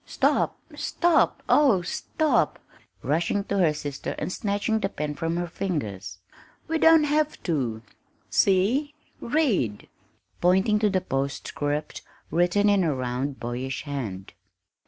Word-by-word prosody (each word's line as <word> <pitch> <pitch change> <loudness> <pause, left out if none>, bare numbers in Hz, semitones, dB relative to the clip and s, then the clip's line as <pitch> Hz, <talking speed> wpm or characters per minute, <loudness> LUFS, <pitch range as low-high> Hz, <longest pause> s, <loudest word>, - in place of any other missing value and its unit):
"Stop - - +1 0.2
stop 340 -2 +1
oh, 250 -12 +4
stop!" 310 - 0
she - - -33 0.3
cried, - - -10
rushing 175 +6 +1
to 200 0 -2
her 170 -4 +4
sister 145 -2 -5
and 170 +5 -3
snatching 205 +2 -1
the 195 -2 -1
pen 150 -6 -4
from 165 +2 -2
her 175 - -1
fingers. 110 - -4 0.5
"We 325 0 0
don't 325 -1 +6
have 300 +1 0
to 125 - -2 0.4
see 225 +10 +2 0.2
read!" 230 - 0 0.5
pointing 190 +4 +3
to 210 -1 +3
the 190 -2 +1
postscript 145 0 -3 0.3
written 175 +4 +2
in 200 -2 +4
a 155 -4 +1
round, 130 +2 -3
boyish 125 +2 -4
hand. 115 -10 -5
175 Hz, 135 wpm, -25 LUFS, 140-210 Hz, 0.5 s, don't